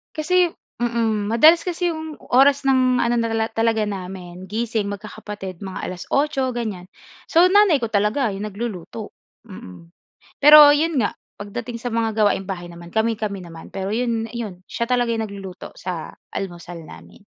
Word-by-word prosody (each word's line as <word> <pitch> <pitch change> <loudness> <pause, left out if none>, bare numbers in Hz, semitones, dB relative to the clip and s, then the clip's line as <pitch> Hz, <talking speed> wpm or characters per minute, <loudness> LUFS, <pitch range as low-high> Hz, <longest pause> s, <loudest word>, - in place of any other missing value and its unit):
Kasi 355 +3 +2 0.3
mm, 225 -3 0
madalas 315 +9 +6
kasi 355 0 -2
'yong 315 -2 -6 0.2
oras 275 +1 +5
ng 255 -2 +3
ano 235 0 +2
na 230 -1 0
nala 225 0 0
talaga 225 -1 +1
namin 185 -2 -7
gising 220 -2 -1
magkakapatid 205 -2 -8
mga 190 -1 -5
alas-otso 265 +8 -1
ganyan. 210 -7 -5 0.4
So 340 +2 +6
nanay 385 -5 +5
ko 235 - -2
talaga 215 +3 +1
'yong 205 +2 -4
nagluluto, 210 0 -6 0.3
mm. 170 - -11 0.5
Pero 295 0 +10
'yon 305 -3 +1
nga, - - -2 0.2
pagdating 230 +3 -6
sa 245 - -3
mga 225 -1 0
gawaing 205 -3 +2
bahay 175 -3 -6
naman 170 0 -12
kami-kami 220 -3 -1
naman. 165 -2 -12
Pero 195 0 -3
'yon 230 0 -1
'yon 215 -6 -6
siya 235 - -2
talaga 245 -1 +1
nagluluto 200 -4 -7
sa 175 -3 -6 0.2
almusal 175 -3 -7
namin. 200 - -14
220 Hz, 150 wpm, -22 LUFS, 195-250 Hz, 0.5 s, Pero